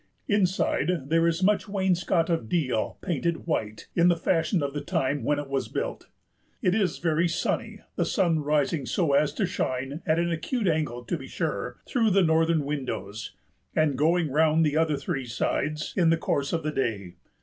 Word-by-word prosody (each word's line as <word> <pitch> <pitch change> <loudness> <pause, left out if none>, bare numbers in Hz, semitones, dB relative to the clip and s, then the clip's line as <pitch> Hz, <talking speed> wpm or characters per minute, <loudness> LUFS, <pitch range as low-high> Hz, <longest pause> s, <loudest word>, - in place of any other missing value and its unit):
Inside 180 -6 +1
there 165 0 +4
is 170 +2 0
much 210 +1 +2
wainscot 185 -3 +1
(of 165 -11 -1
deal) 130 -10 0
painted 170 -2 -2
white 110 -10 -2
in 170 0 +5
the 175 - +5
fashion 165 0 +1
of 140 -1 -2
the 145 - -3
time 140 -1 -1
when 145 +4 +1
it 145 -1 -4
was 135 -1 -2
built. - - -4 0.5
It 180 - +2
is 195 -6 +1
very 165 0 +1
sunny, 170 - -2 0.2
the - - +2
sun 165 -4 +2
rising 145 -1 0
so 165 -6 +1
as 145 +1 +3
to 205 - +1
shine 135 -4 -3
(at 155 0 +3
an 170 0 +1
acute 205 +7 -1
angle 150 -7 0
to 165 - -2
be 135 - -9
sure) - - -3
through 230 -4 +2
the 195 -1 +4
northern 160 -2 +2
windows, 130 -7 -4 0.4
and 155 -3 +2
going 160 +2 +2
round 160 +2 +3
the 150 -1 0
other 155 -2 +2
three 140 -2 -3
sides 150 +6 -2
in 175 -4 +4
the 165 - +4
course 140 -3 -1
of 165 -2 -1
the 155 - -1
day. 100 -10 -3
160 Hz, 185 wpm, -26 LUFS, 140-175 Hz, 0.5 s, in